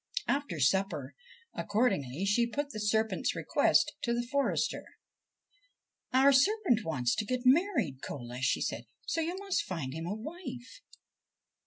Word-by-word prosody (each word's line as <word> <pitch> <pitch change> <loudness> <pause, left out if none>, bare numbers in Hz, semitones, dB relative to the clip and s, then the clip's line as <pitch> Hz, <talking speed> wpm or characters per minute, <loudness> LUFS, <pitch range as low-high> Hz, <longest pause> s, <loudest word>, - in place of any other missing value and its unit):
After 280 - -1
supper, 160 -1 +1 0.4
accordingly, 195 - 0
she 235 +4 +3
put 285 +4 -3
the 215 - -6
serpent's 220 +1 0
request 300 -2 +2
to 235 0 0
the 240 0 -1
forester. 280 - 0 0.7
' - - -41
Our 265 +2 +6
serpent 310 - +3
wants 125 -7 0
to 220 - -1
get 255 +2 -2
married, 255 - +3
Cola/ 125 -2 -6
she 130 - +1
said; - - -3
' - - -33
so 330 - -1
you 340 +3 -2
must 395 -1 -1
find 150 -8 -4
him 165 +2 -5
a 200 - -2
wife.' 260 - -8
235 Hz, 150 wpm, -31 LUFS, 170-285 Hz, 0.7 s, Our